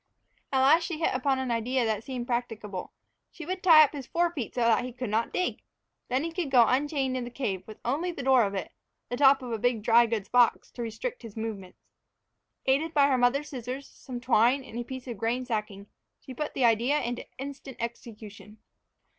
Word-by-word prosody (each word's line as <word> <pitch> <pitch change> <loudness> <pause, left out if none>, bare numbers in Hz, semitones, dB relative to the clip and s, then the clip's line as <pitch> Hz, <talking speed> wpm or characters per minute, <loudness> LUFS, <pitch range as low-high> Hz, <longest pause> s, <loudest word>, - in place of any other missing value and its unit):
At 265 -1 +2
last 315 +6 +5
she 335 - -4
hit 325 - 0
upon 265 +1 +1
an 260 -2 -2
idea 240 +2 0
that 220 -1 -1
seemed 250 -2 -5
practicable. 225 -6 -4 0.4
She 330 - -10
would 370 +2 -4
tie 320 -4 +8
up 290 - +1
his 275 -4 -7
fore 345 0 +1
feet 260 -9 -5
so 245 - -1
that 230 +1 +3
he 250 - -5
could 250 -2 -5
not 225 +2 0
dig! 365 - -2 0.5
Then 255 +3 0
he 330 - -3
could 330 -3 -3
go 245 -3 +6
unchained 270 0 0
in 255 - -2
the 240 - -6
cave, 220 -7 -3
with 215 - -10
only 305 +9 -1
the 280 - -7
door 260 -1 +5
of 200 -1 -2
it 190 - -4 0.4
the 245 - -2
top 270 0 +5
of 245 - -6
a 225 - -2
big 235 -1 0
dry 235 +1 +5
goods 220 -3 -2
box 245 -2 +3
to 245 - -8
restrict 235 - -5
his 225 -1 -11
movements. 210 -5 -6 0.8
Aided 305 +5 +1
by 285 -1 +5
her 265 - +3
mother's 270 +4 +2
scissors, 255 +1 -6
some 250 -3 -9
twine, 250 +2 +3
and 240 -2 -7
a - - -2
piece 260 +1 -8
of 235 -5 -6
grain 240 +4 -1
sacking, 210 -4 -4 0.3
she 260 - -10
put 295 +4 -4
the 260 - +2
idea 235 +6 +3
into 240 0 -3
instant 275 -1 -8
execution. 220 -2 -8
250 Hz, 215 wpm, -28 LUFS, 230-275 Hz, 0.8 s, tie